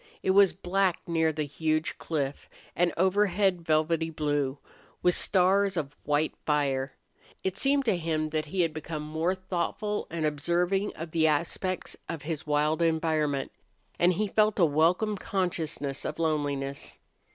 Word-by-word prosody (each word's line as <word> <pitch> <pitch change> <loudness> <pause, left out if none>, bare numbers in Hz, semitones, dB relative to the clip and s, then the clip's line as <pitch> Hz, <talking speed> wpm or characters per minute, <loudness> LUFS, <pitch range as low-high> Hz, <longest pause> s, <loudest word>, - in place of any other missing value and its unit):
It - - +3
was 195 -1 +6
black 185 0 0
near 160 -1 +1
the 155 0 -2
huge 155 +2 -1
cliff, 145 -3 -3 0.3
and 175 0 +2
overhead 190 0 +2
velvety 160 0 +1
blue, 145 -3 -1 0.5
with 180 - +4
stars 190 +1 +3
of 145 -2 -3
white 150 +1 +1
fire. 135 -3 0 0.5
It 190 0 -1
seemed 275 +5 +2
to 220 -5 +3
him 160 -2 -1
that 155 0 -1
he 180 +5 -1
had 165 -2 +1
become 155 -1 -5
more 160 +4 -1
thoughtful 185 +3 -3
and 165 -2 -2
observing 175 +6 0
of 165 0 -7
the 160 -1 +3
aspects 170 +4 -1
of 165 -3 -5
his 155 -1 -4
wild 150 +2 +1
environment, 155 -4 +1 0.5
and 175 +1 +4
he 210 +4 0
felt 215 +1 +2
a 180 - +5
welcome 170 +8 +2
consciousness 160 -8 -2
of 150 - -4
loneliness. 145 -4 -2
165 Hz, 150 wpm, -28 LUFS, 150-185 Hz, 0.5 s, was